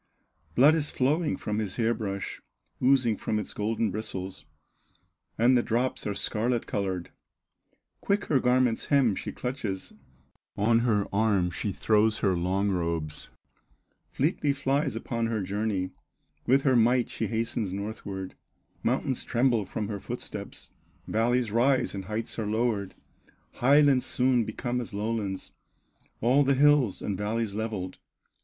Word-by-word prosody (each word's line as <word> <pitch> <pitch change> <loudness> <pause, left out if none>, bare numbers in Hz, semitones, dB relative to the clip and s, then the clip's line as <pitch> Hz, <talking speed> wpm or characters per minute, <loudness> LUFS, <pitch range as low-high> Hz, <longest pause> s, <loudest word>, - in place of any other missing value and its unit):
Blood 140 +5 +7
is 155 -2 0
flowing 150 +5 +1
from 105 0 -2
his 105 -4 -2
hair 115 0 +2
brush, 100 -4 -4 0.4
Oozing 125 -4 +3
from 110 - -2
its 105 - -4
golden 110 0 -1
bristles, 95 -3 -5 0.9
And 120 +3 +5
the 120 - +4
drops 120 +1 -1
are 100 - -2
scarlet 115 +4 0
colored." 95 -3 -3 0.9
Quick 200 +1 0
her 140 - +2
garment's 125 -2 +2
hem 135 -7 +4
she - - -5
clutches, 115 -7 -4 0.6
On 115 +3 +3
her 110 -4 +2
arm 100 -4 +2
she 105 - -3
throws 110 +2 +2
her 95 -3 +1
long 95 +3 0
robes, 85 -4 -2 0.8
Fleetly 145 0 +1
flies 140 -1 0
upon 115 0 -2
her 110 -3 -1
journey; 100 -1 -2 0.6
With 135 +2 +4
her 130 -3 +4
might 120 +1 +4
she - - -3
hastens 115 -3 -1
northward, 100 -1 -5 0.5
Mountains 130 +2 0
tremble 120 -3 +2
from 105 +1 -3
her 100 -1 -4
footsteps, - - -6 0.4
Valleys 120 +1 +1
rise 130 +3 +2
and 95 -2 -5
heights 110 +3 -4
are 110 - -2
lowered, 110 -3 -1 0.6
Highlands 140 0 +4
soon 125 -2 +2
become 120 +3 -3
as 115 -3 -7
lowlands, 105 -2 -3 0.7
All 130 +5 +4
the 140 0 +3
hills 145 -6 +4
and 100 - -1
valleys 105 +2 -2
levelled. 105 -4 -4
115 Hz, 135 wpm, -28 LUFS, 100-125 Hz, 0.9 s, Blood